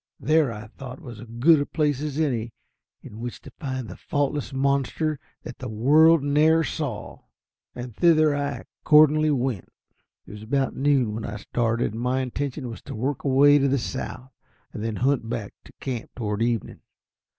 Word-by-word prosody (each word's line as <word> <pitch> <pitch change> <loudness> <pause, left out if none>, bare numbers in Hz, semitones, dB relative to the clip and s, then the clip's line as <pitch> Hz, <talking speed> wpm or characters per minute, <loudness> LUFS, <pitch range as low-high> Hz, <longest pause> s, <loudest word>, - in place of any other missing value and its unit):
There, 155 -4 +2
I 105 -1 -7
thought, 125 +3 -10
was 120 -4 -10
as 120 - -10
good 155 +5 +6
a - - -1
place 145 -3 0
as 150 -2 -4
any 120 -7 -1 0.5
in 105 - -10
which 120 0 -6
to - - -12
find 130 -5 -4
the 90 - -8
"faultless 145 -1 -2
monster 140 +2 0 0.2
that - - -9
the 130 - -5
world 150 +8 +5
ne'er 155 +3 +4
saw," 145 -10 -4 0.6
and 120 -2 -7
thither 155 -2 +4
I 145 0 -3 0.2
accordingly 155 0 +6
went. 125 - -1 0.6
It - - -12
was 105 0 -9
about 135 +5 -1
noon 135 -5 +2
when 110 +1 -5
I 110 - -5
started, 115 +2 -1
and 115 - -5
my 125 +2 0
intention 130 +1 -4
was 115 - -8
to 135 - -5
work 130 +5 -2
away 145 +1 +5
to 140 - +2
the 140 +1 +2
south, 130 +1 -5 0.4
and 105 - -5
then 115 -1 -2
hunt 125 -1 0
back 115 -4 -4
to - - -16
camp 125 -4 -4
toward 105 -3 -3
evening. 115 -2 -1
130 Hz, 180 wpm, -25 LUFS, 115-145 Hz, 0.6 s, good